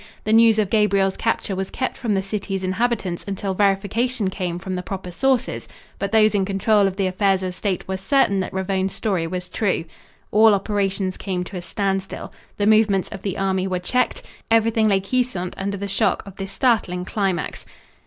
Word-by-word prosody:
The 215 - +1
news 225 -1 +6
of 210 -3 +1
Gabriel's 200 -3 +3
capture 225 -3 -1
was 190 0 -3
kept 260 - -3
from 225 -5 -1
the 190 - 0
city's 195 -1 -3
inhabitants 190 -2 -1
until 195 0 -2
verification 205 +3 +1
came 175 -2 -3
from 185 +1 -5
the 180 - -2
proper 185 -1 -6
sources, 260 +6 0 0.3
but 200 - -2
those 215 -1 +5
in 200 -2 +2
control 200 +1 +2
of 190 - -3
the 195 -1 0
affairs 190 0 +1
of 185 -1 -3
state 190 -1 -2
were 190 0 -2
certain 200 0 +2
that 185 - -3
Ravone's 190 0 -1
story 190 -7 -1
was 180 +1 -4
true. 185 -5 -1 0.5
All 215 0 +6
operations 195 -2 -1
came 185 -2 -3
to 185 +1 -7
a - - -4
standstill. 195 +1 -3 0.2
The 205 - +1
movements 210 -3 +3
of 195 - -8
the 195 -2 -3
army 190 -1 0
were 185 -1 -1
checked. 250 +8 0 0.3
Everything 225 -1 +3
lay 195 -2 +3
quiescent 195 -4 -1
under 200 +1 -3
the 200 +1 -4
shock 195 - +1
of 195 -1 -12
this 195 0 -5
startling 195 -6 +1
climax. 190 -4 -2
195 Hz, 190 wpm, -22 LUFS, 190-215 Hz, 0.5 s, news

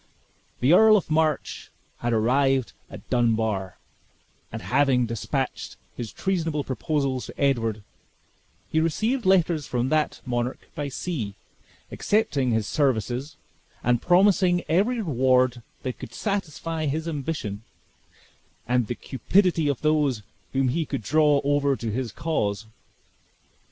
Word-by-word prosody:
The 130 +6 +5
Earl 215 +3 +7
of 180 - -4
March 155 -2 0 0.3
had 120 - -1
arrived 130 +3 +2 0.2
at - - -11
Dunbar; 110 -6 0 0.7
and 115 - -5
having 130 -2 +2
dispatched 115 -4 -3 0.2
his 115 -3 -5
treasonable 165 - -1
proposals 135 0 -2
to - - -12
Edward, 115 -6 +1 0.9
had 160 - +3
received 215 - 0
letters 170 -6 +3
from 125 +1 -1
that 155 0 0
monarch 120 0 -3
by 145 -1 -3
sea, 130 - -4 0.6
accepting 175 - +1
his 110 -2 +1
services, 135 +2 -1 0.5
and 120 -1 +2
promising 180 -1 +4
every 205 +10 +2
reward 130 -5 +2 0.2
that 130 -2 -4
could - - -9
satisfy 165 -5 -2
his 155 +4 -2
ambition, 140 -9 -4 1.1
and 125 -2 +1
the 120 - -3
cupidity 170 - +1
of 140 -4 -1
those 150 -7 +1 0.3
whom 135 -1 +2
he 165 +6 0
could 140 -6 -4
draw 150 +1 +3
over 140 -1 +2
to 115 -3 -4
his 120 0 -3
cause. 110 -9 -2
140 Hz, 125 wpm, -25 LUFS, 120-160 Hz, 1.1 s, Earl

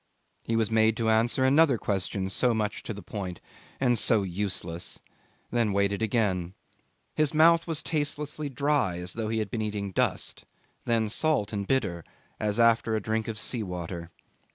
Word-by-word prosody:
He 115 - 0
was 115 -1 +1
made 110 0 +3
to 115 -1 +1
answer 115 +4 +2
another 140 0 +5
question 95 -1 -2
so 120 +3 +2
much 105 -1 -2
to 110 - -5
the 105 - -9
point 95 -4 -5 0.4
and 120 -3 +3
so 110 -2 +5
useless, 90 -2 -3 0.5
then 115 -4 +1
waited 100 +1 +1
again. 100 -5 0 0.6
His 155 0 0
mouth 165 +2 +5
was 165 -2 -2
tastelessly 150 -1 -2
dry, 140 -9 +1
as 90 +1 -5
though 110 -1 -3
he 110 - -1
had 110 -3 -2
been 115 - -2
eating 105 -2 -3
dust, - - -1 0.4
then 115 -2 +1
salt 110 -3 +1
and 100 -1 -3
bitter 100 -11 0 0.4
as 105 +1 0
after 115 -1 +4
a - - +1
drink 110 +2 -2
of 110 -2 -4
sea 115 +3 0
water. 85 -3 -5
110 Hz, 170 wpm, -27 LUFS, 100-125 Hz, 0.6 s, another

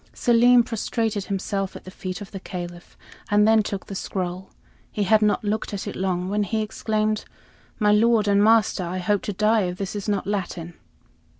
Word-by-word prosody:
Selim 240 0 +5
prostrated 225 -3 -2
himself 195 -1 -3
at - - -9
the 185 - -10
feet 185 0 -6
of 205 - -9
the 195 - -6
Caliph, 175 -1 -8 0.3
and 210 +1 +4
then 220 0 +5
took 200 -2 -4
the - - -8
scroll. 185 -1 -4 0.4
He 210 - -1
had 215 +3 +4
not 210 +2 +2
looked 210 0 -2
at 195 - -5
it - - -5
long 185 -1 -1
when 205 +2 0
he 215 +2 -1
exclaimed: 215 0 -1 0.5
"My 210 -1 +3
lord 220 0 +4
and 200 0 +4
master, 220 -3 +3
I 175 +1 -4
hope 200 +2 0
to 205 - -4
die 215 +3 +3
if 180 0 -4
this 195 +1 -4
is 205 +1 -4
not 200 -2 0
Latin." 180 -4 -3
205 Hz, 195 wpm, -24 LUFS, 185-215 Hz, 0.5 s, Selim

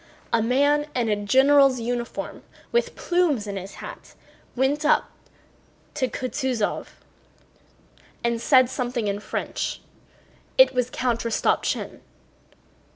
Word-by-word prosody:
A 230 - +4
man 285 +5 +2
in 240 -3 0
a 210 - +2
general's 265 +5 +4
uniform 240 +1 -4 0.3
with 475 - 0
plumes 345 - +1
in 200 -1 -5
his 195 +1 -7
hat - - -10 0.4
went 270 +4 +1
up 305 - +2 0.8
to 270 -4 0
Kutúzov 255 -3 -2 1.4
and 235 -1 0
said 255 -1 +5
something 245 -3 -2
in 200 0 -1
French. - - -4 0.8
It - - +7
was 250 -1 0
Count 245 -2 -1
Rostopchín. 230 -1 -1
250 Hz, 110 wpm, -24 LUFS, 230-280 Hz, 1.4 s, It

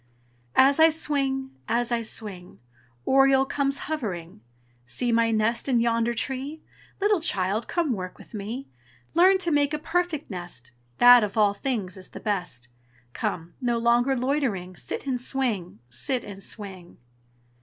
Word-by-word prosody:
As 275 +3 +5
I 320 +1 +8
swing, 275 -4 -1 0.2
as 235 +2 0
I 235 -1 +1
swing, 195 - -7 0.5
Oriole 270 0 +5
comes 275 0 0
hovering. 185 - -4 0.5
"See 240 - -1
my 230 0 +3
nest 225 +4 +1
in 245 -3 +3
yonder 230 0 +1
tree! 270 +6 -4 0.4
Little 410 -3 +2
child, 205 - 0
come 335 -7 0
work 185 -3 -6
with - - -16
me. 220 +6 -5 0.5
Learn 370 +3 +6
to 350 -3 0
make 290 0 +2
a - - -2
perfect 325 -3 -2
nest, 175 -10 -8 0.3
That 245 -1 +8
of 210 +1 -3
all 205 -2 +4
things 205 -6 -3
is 185 - -11
the - - -9
best. 180 - -3 0.5
Come! 170 +1 -3
nor 240 -2 +1
longer 240 +3 +2
loitering 240 -9 -1
Sit - - -5
and 255 -3 -1
swing, 240 -10 -2
sit 255 - -2
and 195 -1 -9
swing!" 190 -5 -7
235 Hz, 150 wpm, -26 LUFS, 200-275 Hz, 0.5 s, I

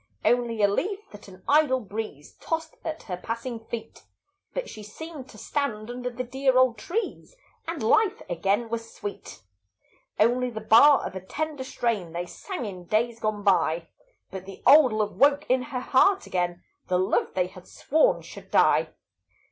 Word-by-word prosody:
Only 235 -3 +2
a - - +7
leaf 395 - -2
that 205 - -12
an 185 -1 -14
idle 290 -3 +4
breeze 210 - -7
Tossed 325 0 -3
at 315 -1 -5
her 180 -3 -5
passing 230 +4 -5
feet; 225 0 -8 0.5
But - - -4
she 215 - -9
seemed 285 +6 -9
to - - -13
stand 240 -6 -3
under 250 0 -4
the 250 +1 -4
dear 265 +1 +1
old 255 -2 +4
trees, 450 +5 -4 0.3
And 330 -6 -4
life 385 - +3
again 195 +7 0
was 230 0 -4
sweet. 205 - -8 0.8
Only 245 +3 +3
the 220 -2 -6
bar 230 +7 +6
of - - -6
a 190 - -5
tender 300 +6 -4
strain 225 -10 -2
They 175 +1 -3
sang 270 - -6
in 185 -4 -7
days 230 +4 0
gone 215 -2 -2
by; 170 -4 +2 0.4
But 190 0 -7
the 195 - -11
old 290 -3 +8
love 215 -1 -1
woke 285 +1 +4
in 255 0 +3
her 250 0 -4
heart 385 +10 +3
again, 175 -1 -2 0.2
The 180 - +2
love 185 +1 0
they 180 - +2
had 180 0 -12
sworn 315 - +2
should - - -12
die. - - +4
235 Hz, 170 wpm, -26 LUFS, 200-280 Hz, 0.8 s, old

